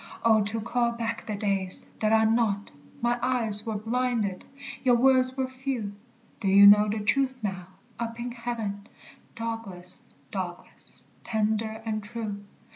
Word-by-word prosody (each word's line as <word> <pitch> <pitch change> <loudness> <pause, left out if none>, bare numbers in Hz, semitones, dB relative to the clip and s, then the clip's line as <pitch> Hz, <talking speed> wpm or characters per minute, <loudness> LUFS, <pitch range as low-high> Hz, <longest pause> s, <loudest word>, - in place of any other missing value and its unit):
Oh, 220 -1 +5
to 220 +2 -2
call 235 +1 0
back 230 -1 -4
the 215 - -2
days 195 -2 -2
that 215 0 +1
are 220 0 +4
not! 220 -3 0 0.3
My 240 0 +1
eyes 230 -4 +5
were 220 -2 -2
blinded, 225 -3 -1 0.4
your 250 -2 +4
words 255 +1 +4
were 265 - 0
few: 260 -5 -4 0.5
Do 205 - -3
you 200 +1 +7
know 210 +1 +7
the 215 +1 -2
truth 260 +5 +1
now, 190 -3 -4 0.3
up 230 0 -4
in 245 +1 -4
heaven, 225 -4 -5 0.5
Douglas, 225 -6 -5 0.3
Douglas, 180 -3 -8 0.2
tender 220 0 -1
and 215 -1 -2
true? 210 -2 -5
220 Hz, 145 wpm, -27 LUFS, 205-240 Hz, 0.5 s, you